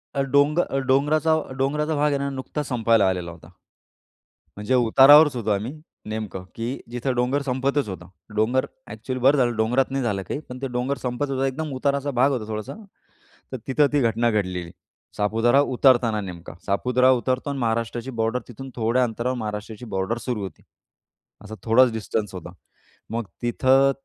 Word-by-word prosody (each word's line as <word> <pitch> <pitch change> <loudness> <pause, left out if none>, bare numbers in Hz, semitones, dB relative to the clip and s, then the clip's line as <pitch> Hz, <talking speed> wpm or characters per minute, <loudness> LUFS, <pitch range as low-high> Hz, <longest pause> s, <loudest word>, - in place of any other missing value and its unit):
अ, 140 - +1
डोंग 145 +2 +4 0.3
डोंगराचा 150 +4 +3 0.3
डोंगराचा 150 +3 0
भाग 150 0 +2
आहे 140 - +1
ना, 140 0 -2
नुकताच 135 +2 -5
संपायला 115 -4 +3
आलेला 90 -2 -3
होता. 80 -1 -14 1.1
म्हणजे 105 +5 0
उतारावरच 135 +4 +7
होतो 110 -3 -3
आम्ही 105 +7 -2 0.4
नेमकं 110 -4 -5
की 115 +1 -4 0.2
जिथं 125 +2 -2
डोंगर 125 +4 +1
संपतच 135 -1 -1
होतं. 90 -2 -8 0.3
डोंगर 120 +5 +2 0.3
ॲक्चुअली 125 +4 -5
बरं 135 +3 +5
झालं 120 -3 +2
डोंगरात 125 +4 +1
नाही 135 -1 -1
झालं 100 -5 -1
काही, - - -2
पण 125 +1 -8
ते 135 - -2
डोंगर 125 +3 -2
संपतच 125 +3 -2
होतं 135 0 0
एकदम 150 +3 -3
उताराचा 140 +1 0
भाग 140 +2 +4
होता 115 -5 -3
थोडासा. 110 -1 -5 0.8
तर 130 - -4
तिथं 145 +2 +3
ती 145 - +3
घटना 115 0 +2
घडलेली 90 -5 -2 0.5
सापुतारा 115 +6 +3
उतरताना 120 -5 +3
नेमका. 90 -3 -8
सापुतारा 125 +6 +3
उतरतो 130 +4 -2
आणि 140 - -3
महाराष्ट्राची 115 +2 -2
बॉर्डर 115 +3 0
तिथून 130 +3 -9
थोड्या 120 +2 +1
अंतरावर 120 +2 -2
महाराष्ट्राची 110 +1 -6
बॉर्डर 95 +5 -1
सुरू 120 -5 -2
होती. 95 - -8 0.8
असा 110 +1 -8
थोडाच 120 +2 +5
डिस्टन्स 110 -2 -3
होता. 90 - -8 0.6
मग 115 0 -2 0.2
तिथं 130 +3 +3
125 Hz, 160 wpm, -23 LUFS, 110-135 Hz, 1.1 s, उतारावरच